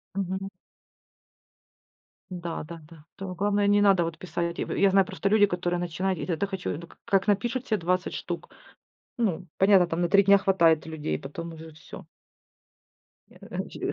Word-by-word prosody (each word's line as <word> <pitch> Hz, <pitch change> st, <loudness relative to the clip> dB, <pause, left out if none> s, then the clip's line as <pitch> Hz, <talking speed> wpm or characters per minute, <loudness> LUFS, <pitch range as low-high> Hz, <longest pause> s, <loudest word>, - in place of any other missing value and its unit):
Мгм. 195 Hz, 0 st, -3 dB, 1.8 s
Да-да-да. 165 Hz, -3 st, -7 dB
Тут 190 Hz, -2 st, -6 dB
главное 205 Hz, +2 st, +1 dB
не 205 Hz, 0 st, +4 dB
надо 195 Hz, -4 st, +4 dB
вот 165 Hz, -1 st, -4 dB
писать. 170 Hz, 0 st, -3 dB
В -, -, -3 dB
я 200 Hz, -1 st, +4 dB
знаю 195 Hz, 0 st, +5 dB
просто 195 Hz, -, -2 dB
люди, 205 Hz, 0 st, +5 dB
которые 175 Hz, -2 st, -2 dB
начинают, 175 Hz, +1 st, -2 dB
и -, -, -4 dB
тогда 175 Hz, +2 st, -1 dB
хочу, 190 Hz, -2 st, -4 dB
ну, 170 Hz, -, -9 dB
к -, -, -19 dB
как 195 Hz, 0 st, +2 dB
напишут 235 Hz, +5 st, 0 dB
се 215 Hz, -, +1 dB
20 180 Hz, +1 st, -1 dB
штук. -, -, -5 dB, 0.7 s
Ну, 190 Hz, -5 st, -1 dB
понятно, 195 Hz, -2 st, +5 dB
там 170 Hz, +1 st, -2 dB
на 175 Hz, -, +1 dB
3 200 Hz, 0 st, +6 dB
дня 200 Hz, +1 st, +6 dB
хватает 170 Hz, -5 st, +3 dB
людей, 150 Hz, -, -3 dB
потом 165 Hz, +4 st, -7 dB
уже 160 Hz, 0 st, -10 dB
всё. 155 Hz, -, -12 dB, 1.2 s
Я -, -, -6 dB
185 Hz, 160 wpm, -27 LUFS, 170-195 Hz, 1.8 s, 3